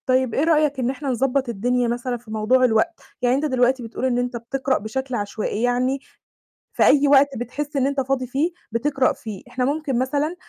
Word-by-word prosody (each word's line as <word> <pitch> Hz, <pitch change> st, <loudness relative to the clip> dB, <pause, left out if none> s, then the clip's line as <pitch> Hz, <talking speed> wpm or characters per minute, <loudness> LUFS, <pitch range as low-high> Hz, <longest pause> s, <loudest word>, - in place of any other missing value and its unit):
طيب 255 Hz, -2 st, +2 dB
إيه 285 Hz, -, +1 dB
رأيك 305 Hz, -4 st, +2 dB
إن 250 Hz, -1 st, 0 dB
إحنا 270 Hz, +1 st, -4 dB
نضبط 265 Hz, +1 st, 0 dB
الدنيا 245 Hz, +3 st, 0 dB
مثلًا 245 Hz, +1 st, -2 dB
في 230 Hz, -2 st, -14 dB
موضوع 220 Hz, +4 st, +2 dB
الوقت، 245 Hz, +9 st, +1 dB, 0.2 s
يعني 250 Hz, 0 st, +3 dB
أنت 285 Hz, +3 st, 0 dB
دلوقتي 255 Hz, -2 st, +2 dB
بتقول 230 Hz, +3 st, -4 dB
إن 250 Hz, -2 st, +1 dB
أنت 245 Hz, 0 st, -1 dB
بتقرأ 265 Hz, +3 st, -1 dB
بشكل 260 Hz, +4 st, -4 dB
عشوائي، 210 Hz, 0 st, -3 dB
يعني 250 Hz, +2 st, +1 dB, 0.7 s
في -, -, +3 dB
أي 285 Hz, 0 st, +5 dB
وقت 280 Hz, 0 st, +6 dB
بتحس 285 Hz, +6 st, -5 dB
إن 270 Hz, -1 st, +2 dB
أنت 280 Hz, -1 st, 0 dB
فاضي 260 Hz, -1 st, -1 dB
فيه 285 Hz, +8 st, 0 dB, 0.2 s
بتقرأ 260 Hz, +3 st, +1 dB
فيه، 215 Hz, -5 st, -8 dB
إحنا 250 Hz, +1 st, -2 dB
ممكن 285 Hz, -3 st, -1 dB
مثلًا 290 Hz, +6 st, -1 dB
255 Hz, 195 wpm, -22 LUFS, 245-275 Hz, 0.7 s, وقت